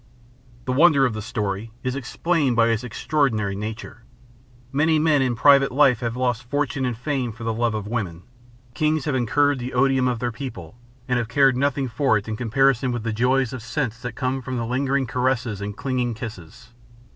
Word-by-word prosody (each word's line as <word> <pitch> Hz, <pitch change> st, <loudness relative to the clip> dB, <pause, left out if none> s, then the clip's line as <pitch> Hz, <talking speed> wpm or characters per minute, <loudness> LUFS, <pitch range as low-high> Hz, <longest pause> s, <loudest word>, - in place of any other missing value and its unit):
The 130 Hz, -, -1 dB
wonder 140 Hz, 0 st, +5 dB
of 125 Hz, -, 0 dB
the 110 Hz, -, -5 dB
story 105 Hz, -2 st, -3 dB
is 130 Hz, 0 st, -2 dB
explained 140 Hz, 0 st, 0 dB
by 115 Hz, 0 st, +4 dB
its 115 Hz, +1 st, 0 dB
extraordinary 125 Hz, -4 st, 0 dB
nature. 110 Hz, +3 st, -6 dB, 0.7 s
Many 155 Hz, +3 st, +2 dB
men 155 Hz, -2 st, +3 dB
in 125 Hz, -2 st, +1 dB
private 140 Hz, +2 st, +5 dB
life 135 Hz, -3 st, +4 dB
have 115 Hz, -1 st, -3 dB
lost 125 Hz, -2 st, 0 dB
fortune 145 Hz, -1 st, -1 dB
and 125 Hz, -3 st, -2 dB
fame 125 Hz, -1 st, -2 dB
for 115 Hz, +2 st, -10 dB
the 115 Hz, 0 st, -1 dB
love 115 Hz, 0 st, 0 dB
of 105 Hz, -2 st, -4 dB
woman. 100 Hz, -7 st, -4 dB, 0.5 s
Kings 155 Hz, +1 st, 0 dB
have 150 Hz, -, 0 dB
incurred 140 Hz, +3 st, +2 dB
the 125 Hz, +1 st, -5 dB
odium 135 Hz, 0 st, +3 dB
of 125 Hz, -1 st, 0 dB
their 120 Hz, +1 st, -2 dB
people, 110 Hz, -, -8 dB, 0.3 s
and 125 Hz, -1 st, +1 dB
have 115 Hz, -, -2 dB
cared 135 Hz, +2 st, +3 dB
nothing 140 Hz, 0 st, 0 dB
for 125 Hz, -1 st, +2 dB
it 100 Hz, -, -6 dB
in 110 Hz, -, -3 dB
comparison 125 Hz, +2 st, +2 dB
with 120 Hz, -2 st, -3 dB
the 115 Hz, -1 st, -2 dB
joys 125 Hz, +2 st, +1 dB
of 130 Hz, -, -6 dB
sense 120 Hz, -1 st, -3 dB
that 125 Hz, 0 st, -6 dB
come 130 Hz, 0 st, -2 dB
from 130 Hz, 0 st, -4 dB
the 115 Hz, -, -2 dB
lingering 135 Hz, +3 st, 0 dB
caresses 125 Hz, -3 st, -1 dB
and 100 Hz, 0 st, -5 dB
clinging 125 Hz, -3 st, -1 dB
kisses. 110 Hz, -4 st, -9 dB
125 Hz, 195 wpm, -23 LUFS, 115-135 Hz, 0.7 s, wonder